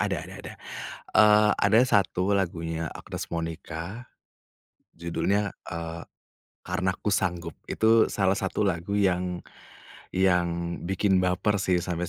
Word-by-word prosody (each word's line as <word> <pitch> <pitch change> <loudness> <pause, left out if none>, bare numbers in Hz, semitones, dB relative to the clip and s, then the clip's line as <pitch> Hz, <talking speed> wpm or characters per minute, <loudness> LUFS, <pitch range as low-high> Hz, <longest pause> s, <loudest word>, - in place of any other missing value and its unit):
ada - - 0
ada - - -10
ada. - - -8 0.6
Eee, 105 0 +6
ada 110 +3 +5
satu 100 -4 +2
lagunya 85 -4 -1
Agnes - - -7
Monica 85 +6 -5 0.9
judulnya, 100 +4 0 0.2
eee, 85 0 -6 0.6
Karena 95 0 -1
Ku 105 - 0
Sanggup 85 -4 -1 0.2
itu 110 0 +4
salah 95 -1 +2
satu 100 +1 -1
lagu 95 +2 -1
yang 90 -2 0 0.7
yang 85 -2 +1
bikin 95 0 +2
baper 90 +3 +1
sih 95 -2 +2
sampai 90 0 -2
90 Hz, 120 wpm, -27 LUFS, 85-100 Hz, 0.9 s, Eee